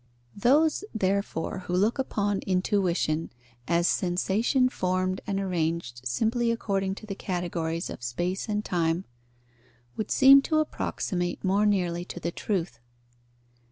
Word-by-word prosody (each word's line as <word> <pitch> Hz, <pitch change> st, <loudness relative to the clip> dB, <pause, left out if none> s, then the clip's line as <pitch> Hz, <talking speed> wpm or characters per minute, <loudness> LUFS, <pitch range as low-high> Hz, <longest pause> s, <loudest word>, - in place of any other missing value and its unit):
_ -, -, -11 dB
Those, 300 Hz, -, +4 dB
therefore, 195 Hz, -5 st, -1 dB
who 180 Hz, -, -1 dB
look 210 Hz, +8 st, +2 dB
upon 205 Hz, -6 st, 0 dB
intuition 180 Hz, -4 st, +1 dB, 0.4 s
as 170 Hz, +1 st, +2 dB
sensation 200 Hz, +8 st, +2 dB
formed 185 Hz, -4 st, -1 dB
and 195 Hz, -1 st, -1 dB
arranged 165 Hz, -9 st, -2 dB
simply 230 Hz, -, +1 dB
according 195 Hz, -4 st, -1 dB
to 215 Hz, -, -10 dB
the 205 Hz, -, -4 dB
categories 175 Hz, -3 st, -3 dB
of -, -, -8 dB
space 175 Hz, -, -2 dB
and 210 Hz, 0 st, -1 dB
time, 170 Hz, +1 st, 0 dB, 0.9 s
would 215 Hz, -, -3 dB
seem 275 Hz, +1 st, +8 dB
to 310 Hz, +2 st, 0 dB
approximate 180 Hz, -11 st, -2 dB
more 200 Hz, +2 st, +3 dB
nearly 175 Hz, -4 st, 0 dB
to 175 Hz, -, -7 dB
the 170 Hz, -, -3 dB
truth. 170 Hz, -, -3 dB
190 Hz, 130 wpm, -27 LUFS, 175-210 Hz, 0.9 s, seem